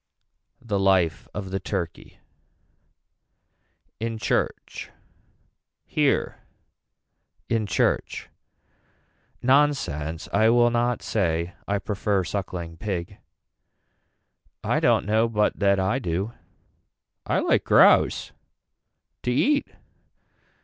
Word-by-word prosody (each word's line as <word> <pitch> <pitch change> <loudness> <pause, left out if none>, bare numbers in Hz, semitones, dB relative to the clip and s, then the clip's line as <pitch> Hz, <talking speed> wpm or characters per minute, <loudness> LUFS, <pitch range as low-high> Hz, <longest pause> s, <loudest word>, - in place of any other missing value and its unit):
The 105 -4 -1
life 95 -5 +2
of 95 -2 -6
the 95 - -1
turkey. 85 -2 -5 1.8
In 115 0 -3
church. 110 - -2 1.0
Here - - 0 1.1
in 115 -2 0
church. - - 0 1.2
Nonsense 125 - +1
I 110 +2 +4
will 120 0 +4
not 120 +1 0
say 85 -4 -1
I 100 - +1
prefer 100 0 -1
suckling 85 -3 -5
pig. 95 0 -4 1.4
I - - +1
don't - - +3
know 110 +2 +2
but 105 -2 0
that 100 -1 +3
I 95 +8 +1
do. 95 +1 -2 0.9
I - - +1
like - - +2
grouse. - - +4 0.9
To 125 - -1
eat. 285 - +2
100 Hz, 90 wpm, -25 LUFS, 90-115 Hz, 1.8 s, I